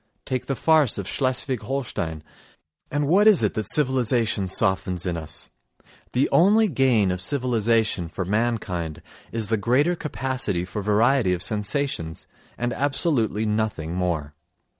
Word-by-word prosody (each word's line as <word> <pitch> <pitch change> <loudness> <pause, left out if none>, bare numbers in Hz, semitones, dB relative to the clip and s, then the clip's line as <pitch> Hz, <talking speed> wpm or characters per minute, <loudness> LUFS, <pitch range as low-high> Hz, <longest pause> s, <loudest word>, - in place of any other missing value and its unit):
Take 130 -2 -2
the 135 - -1
farce 155 -4 +3
of 100 -2 -4
Schleswig 130 -1 -1
Holstein.... 85 - -4 0.7
And 145 0 -1
what 195 +7 +4
is 200 - +6
it 105 - +1
that 110 -2 -1
civilisation 120 -7 +1
softens 95 -1 0
in 90 -2 -1
us? 80 -2 -4 0.6
The 130 +3 +2
only 210 +6 +5
gain 125 - +2
of 90 0 -3
civilisation 115 - 0
for 95 +2 -4
mankind 100 -6 -2 0.3
is 115 -3 -2
the 110 - +2
greater 130 - +2
capacity 130 - -2
for 105 +3 -5
variety 110 +1 +2
of 90 0 -2
sensations—and 115 - -3
absolutely 130 - 0
nothing 105 -7 -2
more. 85 -5 -2
115 Hz, 135 wpm, -24 LUFS, 95-135 Hz, 0.7 s, is